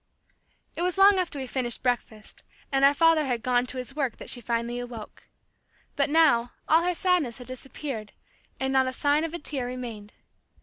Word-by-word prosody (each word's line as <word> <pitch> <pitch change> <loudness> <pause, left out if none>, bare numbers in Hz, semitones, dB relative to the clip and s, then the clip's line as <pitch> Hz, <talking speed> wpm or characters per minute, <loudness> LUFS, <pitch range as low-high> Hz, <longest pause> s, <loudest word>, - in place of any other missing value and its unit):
It - - -4
was 360 +1 0
long 390 0 +6
after 355 -5 -2
we 265 - -3
finished 250 -2 -3
breakfast, 235 -4 -3 0.3
and 270 0 +2
our 280 +1 +6
father 330 0 +4
had 245 -3 -2
gone 250 0 +1
to 260 - -3
his 255 +2 -6
work, 270 -6 -1
that - - -4
she 245 - -2
finally 235 +1 -2
awoke. 240 -3 -9 0.7
But - - +1
now, 285 -7 +3
all 320 +2 +5
her 355 +1 0
sadness 350 - +1
had 250 - -10
disappeared, 255 -3 -6 0.5
and 265 0 -1
not 265 -1 +3
a 260 - -2
sign 290 +3 +2
of 330 +1 -3
a - - -2
tear 275 -5 -1
remained. 235 -5 -7
260 Hz, 190 wpm, -26 LUFS, 245-310 Hz, 0.7 s, long